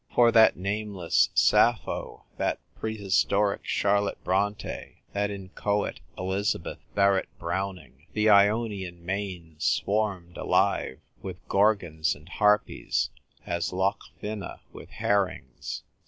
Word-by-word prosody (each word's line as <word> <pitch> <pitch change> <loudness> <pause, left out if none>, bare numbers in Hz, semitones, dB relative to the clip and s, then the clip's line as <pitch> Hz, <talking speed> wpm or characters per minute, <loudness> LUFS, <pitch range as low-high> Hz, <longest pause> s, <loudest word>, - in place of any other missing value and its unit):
For 120 -1 +6
that 110 -1 +6
nameless 100 -2 +1
Sappho, - - +2
that - - 0 0.2
prehistoric 100 -1 +1
Charlotte 100 0 +1
Bronte, 100 +3 -2
that 100 0 0
inchoate 100 +1 -2 0.2
Elizabeth 95 +2 -2 0.2
Barrett 100 -1 +3
Browning, 90 -4 -5
the 105 0 +2
Ionian 100 -4 +3
main 90 -4 -4
swarmed 100 -4 0
alive 65 - +1 0.2
with 90 -2 -8
Gorgons 90 -7 +2
and 75 +2 -17
Harpies 105 +1 +1 0.3
as 85 -1 -2
Loch 95 +3 0 0.2
Fyne 105 -1 -4 0.3
with - - -11
herrings. 90 -11 -2
100 Hz, 100 wpm, -27 LUFS, 90-105 Hz, 0.3 s, For